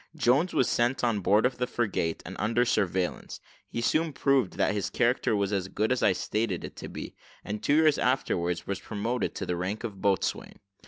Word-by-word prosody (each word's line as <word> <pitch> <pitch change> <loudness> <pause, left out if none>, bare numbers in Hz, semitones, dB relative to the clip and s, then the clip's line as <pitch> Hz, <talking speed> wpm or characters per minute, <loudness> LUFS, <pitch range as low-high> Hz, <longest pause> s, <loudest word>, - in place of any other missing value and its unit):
Jones 140 +9 +3
was 125 - +2
sent 120 +2 +1
on 115 -4 +2
board 105 +4 +3
of 125 0 0
the 125 - 0
frigate, 95 -8 -1
and - - -7
under 115 +4 +2
surveillance: 95 -5 -1 0.3
he 115 - -3
soon 155 +6 +1
proved 135 -5 +2
that - - +1
his 100 -2 -2
character 120 -2 +1
was 100 0 0
as 95 -2 -1
good 105 +4 -1
as 130 - +1
I - - +5
stated 105 0 -2
it - - -8
to - - -7
be, - - -7 0.3
and 105 +1 -4
two 145 - +2
years 155 -1 +4
afterwards 90 -9 0
was 100 -1 -3
promoted 110 +4 -3
to - - -3
the 90 - -1
rank 95 +6 -3
of 100 -5 -6
boatswain. 100 -1 0
110 Hz, 205 wpm, -28 LUFS, 100-125 Hz, 0.3 s, I